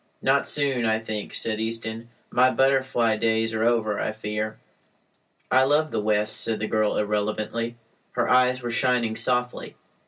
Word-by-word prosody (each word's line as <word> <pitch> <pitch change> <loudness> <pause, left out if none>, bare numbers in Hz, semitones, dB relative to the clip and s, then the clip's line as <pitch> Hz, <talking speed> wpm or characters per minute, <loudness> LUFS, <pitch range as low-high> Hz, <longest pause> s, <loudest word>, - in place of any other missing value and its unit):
"Not - - +2
soon, 140 -4 +1
I 110 -1 +2
think," 110 -1 -6
said 110 -1 -1
Easton. 115 0 -4 0.2
"My 125 +1 +4
butterfly 130 -4 +2
days 110 0 0
are 110 0 -1
over, 115 -3 +1
I 110 - -2
fear." 110 0 -4 0.9
"I 130 +1 +5
love 150 +3 +2
the - - -1
West," 105 0 0
said 110 -1 -1
the 110 - -2
girl 110 -1 0
irrelevantly. 110 +3 -2 0.4
Her - - 0
eyes 125 0 +3
were 120 - -3
shining 120 -2 +1
softly. 125 0 0
115 Hz, 155 wpm, -24 LUFS, 110-125 Hz, 0.9 s, I